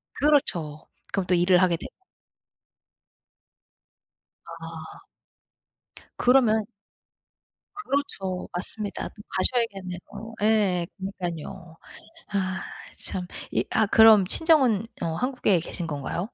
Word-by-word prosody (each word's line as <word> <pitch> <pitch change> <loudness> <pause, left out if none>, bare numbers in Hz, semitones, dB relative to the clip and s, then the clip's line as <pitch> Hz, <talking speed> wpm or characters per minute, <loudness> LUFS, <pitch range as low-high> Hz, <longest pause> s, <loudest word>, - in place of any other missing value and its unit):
그렇죠. 170 - +1 0.3
그럼 195 -2 0
또 180 - +3
일을 180 +1 +4
하게 175 -3 +3
되고. 175 - -11 2.6
아. - - -9 1.2
그러면 235 -4 +4 1.1
그렇죠. 280 - -3
맞습니다. 205 +3 -5
또 210 - -14
가셔야겠네요. 195 -4 +1 0.4
예. 200 -5 +2
그러니깐요. 175 -3 -6 0.6
아 190 -2 -1 0.4
참. 180 -1 -4 0.2
이 - - 0
아 220 -1 +2
그럼 220 -2 +7
친정은 260 - +3 0.2
어 - - 0
한국에 230 -4 +1
계신 170 +1 -5
건가요? 145 +2 -4
195 Hz, 200 characters per minute, -25 LUFS, 175-225 Hz, 2.6 s, 그럼